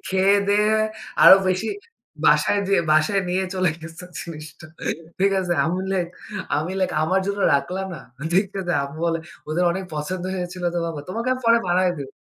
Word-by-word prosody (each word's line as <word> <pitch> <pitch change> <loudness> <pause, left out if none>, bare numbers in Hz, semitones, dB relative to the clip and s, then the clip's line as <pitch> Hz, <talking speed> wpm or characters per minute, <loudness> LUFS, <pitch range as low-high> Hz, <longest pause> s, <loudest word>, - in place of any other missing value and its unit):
খেয়ে 190 +1 +4
দেয়ে 210 +1 +3 0.5
আরো 190 - +11
বেশি 185 +4 0 0.6
বাসায় 205 - +4
দে 195 - +3 0.2
বাসায় 155 +6 +3
নিয়ে 185 +2 0
চলে 185 -2 +2
গেছে 165 +2 -10 0.2
জিনিসটা। 155 -1 -9 0.5
ঠিক 195 +1 +3
আছে? 180 -2 -1
আমি 185 -1 -3
লাইক, 185 - +1
আমার 185 +5 +2
জন্য 200 0 -2
রাখলা 180 +7 -1
না? 160 - -7 0.3
দেখতে 195 +1 +1 0.3
আম্মু 140 +3 -9
বলে 165 0 0 0.3
ওদের 165 +4 +1
অনেক 190 +2 -4
পছন্দ 175 +5 -4
হয়েছিল 180 0 -5
তো - - 0
বাবা। 160 -3 -4
তোমাকে 230 +6 -3
আমি 255 - -4
পরে 230 0 +6
বানায় 180 +1 +3
দিব। 140 -2 -6
185 Hz, 160 wpm, -23 LUFS, 165-195 Hz, 0.6 s, আরো